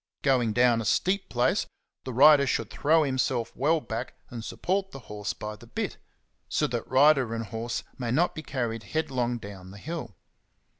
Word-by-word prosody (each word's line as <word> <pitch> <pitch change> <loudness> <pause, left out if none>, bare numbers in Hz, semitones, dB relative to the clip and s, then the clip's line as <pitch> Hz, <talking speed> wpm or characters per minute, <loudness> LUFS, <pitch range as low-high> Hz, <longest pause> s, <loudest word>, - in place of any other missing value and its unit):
Going 125 -5 +3
down 120 0 +4
a - - -5
steep 190 - +1
place, 120 0 +1 0.4
the 130 - -4
rider 140 +2 +7
should 115 -4 -1
throw 160 +2 +3
himself 130 -3 -1
well 155 +5 +2
back, 115 -6 -5 0.2
and 115 -2 -6
support 190 - -1
the 135 - -9
horse 105 -1 -3
by 105 0 -6
the - - -15
bit, - - -3 0.5
so - - +1
that - - -3
rider 130 -3 +4
and 115 0 -3
horse 115 +2 -4 0.2
may 120 -2 -2
not 160 +9 +2
be 155 - -6
carried 120 -6 -3
headlong 125 -2 -1
down 100 -4 -10
the 100 - -11
hill. 125 - -6
125 Hz, 180 wpm, -27 LUFS, 115-150 Hz, 0.5 s, rider